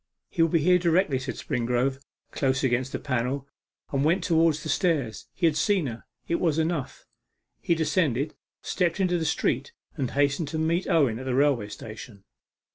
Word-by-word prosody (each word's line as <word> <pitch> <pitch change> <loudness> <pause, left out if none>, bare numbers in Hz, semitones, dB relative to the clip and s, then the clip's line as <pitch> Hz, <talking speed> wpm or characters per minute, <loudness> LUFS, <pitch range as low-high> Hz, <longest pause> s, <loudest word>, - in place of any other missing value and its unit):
'He 170 - -1
will 165 - +4
be 165 0 +2
here 180 +1 +5
directly,' 170 -5 +2
said 130 -2 -5
Springrove, 125 +3 -1 0.3
close 130 -1 0
against 130 0 +1
the - - -2
panel, 130 +1 -2 0.4
and 140 - 0
then - - +2
went 170 +4 +2
towards 165 -3 +2
the 155 - -5
stairs. 145 - 0
He 180 - -1
had 160 -2 +3
seen 180 +2 +2
her; 115 -3 -6 0.2
it 170 - 0
was 160 -4 +1
enough. 160 -4 -2 0.6
He 170 - +2
descended, 155 -3 0 0.3
stepped 180 0 0
into 180 -2 +2
the 160 - -2
street, 465 - 0 0.2
and 135 -6 -2
hastened 145 +3 +1
to 160 +2 -4
meet 165 +3 0
Owen 135 -9 +3
at 130 - -7
the 130 -1 -1
railway 135 -6 +2
station. 110 -1 -10
150 Hz, 185 wpm, -26 LUFS, 130-165 Hz, 0.6 s, here